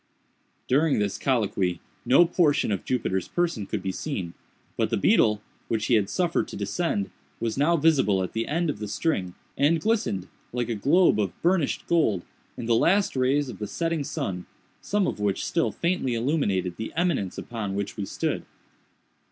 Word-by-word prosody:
During 145 +3 +3
this 105 -2 -1
colloquy 100 -8 0 0.3
no 155 +7 +7
portion 165 - +2
of 100 - -1
Jupiter's 95 -7 -1
person 170 - -1
could - - -3
be 95 - -1
seen; 95 - -4 0.4
but - - 0
the - - 0
beetle, 105 0 +3 0.2
which 110 -1 -1
he - - +1
had 105 -4 +3
suffered 175 -2 0
to - - -8
descend, 160 - -1 0.3
was 115 -1 -1
now 160 +5 +3
visible 135 -12 +3
at 90 - -5
the 115 0 -2
end 165 +1 0
of 120 - -9
the 105 - -4
string, 100 - -1 0.2
and 155 +4 +3
glistened, 160 - 0 0.3
like 120 -1 -1
a - - 0
globe 140 - +4
of 100 -5 -2
burnished 175 -4 +1
gold, 110 - +2 0.3
in - - -5
the 115 - +2
last 190 - +3
rays 135 +3 +2
of 125 - -8
the 105 - -3
setting 165 +4 -1
sun, 90 -8 -4 0.3
some 205 -1 +1
of - - -2
which 100 -2 0
still 165 - +1
faintly 170 -8 -1
illumined 110 - 0
the 110 - -5
eminence 160 - 0
upon 105 -5 -4
which 100 0 -3
we 105 - -3
stood. - - -2
125 Hz, 175 wpm, -26 LUFS, 100-165 Hz, 0.4 s, no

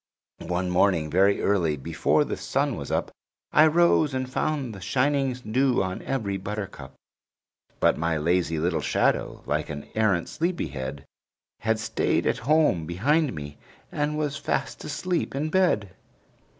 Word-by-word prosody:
One 90 +1 -1
morning, 90 -4 +2
very 95 +4 +3
early, 85 -7 +2
before 65 - +1
the - - -3
sun - - -1
was - - -6
up, - - -1 0.4
I 155 +1 +6
rose 160 -3 +3
and 130 0 -2
found 130 -2 -2
the 95 - -10
shining 135 +5 +1
dew 125 0 +1
on 95 0 -4
every 110 -8 -2
buttercup; 100 +1 -6 0.8
But - - +3
my 80 0 0
lazy 85 +1 +1
little 85 +4 0
shadow, - - 0
like - - -1
an 75 -1 -6
arrant 105 -6 +1
sleepy 170 - -2
head, 70 +1 -6 0.5
Had 110 0 +1
stayed 110 - 0
at - - +1
home 150 - +3
behind 140 - +1
me 75 -1 -8 0.3
and 150 +1 -1
was 150 -1 -1
fast - - -2
asleep 175 0 -2
in 155 +3 -2
bed! 165 - +2
105 Hz, 150 wpm, -26 LUFS, 85-145 Hz, 0.8 s, I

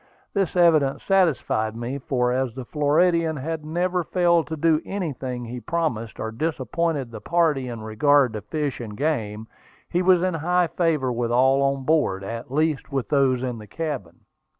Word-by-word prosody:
This 195 -4 0
evidence 160 -6 +3
satisfied 155 - +1
me, 120 +4 -4
for 125 -3 0
as 130 -2 -1
the 130 -2 -6
Floridian 160 +3 +2
had 155 +3 -4
never 175 +3 -1
failed 170 -1 +2
to 160 - -4
do 160 0 +3
anything 135 -10 -4
he 125 +2 -6
promised, 120 -8 -2
or 110 - -3
disappointed 145 +1 -2
the 110 -2 -8
party 160 -7 +1
in 120 -2 -6
regard 130 +3 +3
to 105 - -4
fish 145 +6 -3
and 105 -3 -7
game, 110 -8 -2 0.5
he 175 - +2
was 180 -1 +4
in 185 -1 +1
high 175 +3 +1
favor 160 -6 0
with 120 0 -1
all 130 +3 +4
on 135 -1 0
board, 130 -11 +1
at 115 +4 -6
least 155 +1 0
with 135 -3 -2
those 135 -3 +2
in 125 -3 -3
the 105 - -11
cabin. 145 - -5
140 Hz, 175 wpm, -24 LUFS, 120-165 Hz, 0.5 s, was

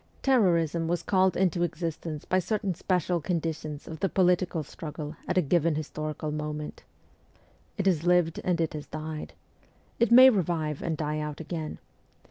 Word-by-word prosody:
Terrorism 170 - +3
was 175 +1 -1
called 185 -2 +2
into 180 -2 +1
existence 165 -2 -3
by 185 - +2
certain 195 0 -1
special 180 0 0
conditions 155 -3 -3
of 160 -1 -7
the 195 - +1
political 180 -3 +2
struggle 150 0 -7
at 180 - 0
a 180 - +4
given 165 +1 +2
historical 155 0 -4
moment. 150 0 -5 1.0
It 195 - -1
has 175 -5 +2
lived, 175 -2 +3
and 180 -2 +1
has 155 -2 -2
died. 155 0 -6 0.7
It 235 -1 +3
may 260 +2 +10
revive 165 - -1
and 160 -2 -2
die 150 0 -2
out 150 -1 -4
again. 160 -1 -5
165 Hz, 150 wpm, -28 LUFS, 155-180 Hz, 1.0 s, may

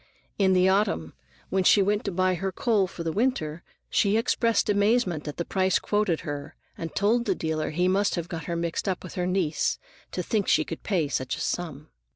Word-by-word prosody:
In 190 -1 +4
the 185 0 +4
autumn, 190 - +1 0.4
when 190 0 +1
she 200 +2 +6
went 205 +2 +1
to 200 - -1
buy 185 +1 +2
her 190 +2 -2
coal 205 -1 +1
for 175 -1 -7
the 165 - -1
winter, 170 -8 -1 0.3
she 205 +1 +2
expressed 230 -1 +2
amazement 205 -6 +2
at 150 - -5
the 170 - -2
price 190 -1 +2
quoted 205 -6 0
her, 145 0 -6 0.2
and 165 - -6
told 225 +4 +2
the 195 -4 +1
dealer 160 -2 -2
he 180 +4 +1
must 195 +2 +2
have 170 -2 -3
got 165 -3 -6
her 170 - -2
mixed 170 +3 -2
up 185 - -2
with 185 - -8
her 180 -1 -1
niece 175 -6 0 0.3
to 180 - -3
think 205 +2 0
she 155 - +3
could 165 - -6
pay 175 -7 0
such 130 -1 -2
a - - -8
sum. 155 -4 -3
185 Hz, 210 wpm, -26 LUFS, 160-205 Hz, 0.4 s, she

